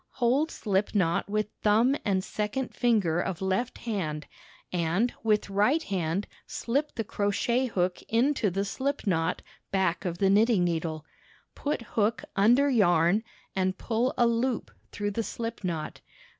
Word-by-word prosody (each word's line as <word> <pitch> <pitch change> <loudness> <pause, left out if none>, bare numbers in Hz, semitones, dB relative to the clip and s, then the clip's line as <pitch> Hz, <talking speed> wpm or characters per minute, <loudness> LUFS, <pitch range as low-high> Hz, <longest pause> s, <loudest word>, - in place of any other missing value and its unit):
Hold 265 +5 +2
slip 205 -5 -1
knot 175 -1 +1
with 215 0 0
thumb 225 +6 +4
and 190 -2 +1
second 215 +7 -3
finger 205 -9 +2
of 185 -3 -3
left 190 +6 -1
hand 160 -10 -3 0.5
and 180 +7 +1
with 215 -2 +2
right 210 +11 +2
hand 185 0 -1 0.2
shp 280 +6 -2
the 225 - -1
crochet 225 +5 0
hook 180 -5 -1
into 235 -1 +2
the 195 +2 -1
slip 275 +7 -2
knot 165 -3 0 0.3
back 190 -3 0
of 175 -3 -3
the 195 +1 +3
knitting 210 -1 +4
needle. 160 -2 -2 0.5
Put 285 -5 -2
hook 220 0 0
under 240 +8 +5
yarn 195 - +3 0.3
and 185 0 0
pull 240 +2 0
a 240 - +5
loop 235 +1 0 0.2
through 205 0 -2
the 230 - -1
slip 230 0 -5
knot. 165 -4 -4
205 Hz, 145 wpm, -28 LUFS, 185-235 Hz, 0.5 s, under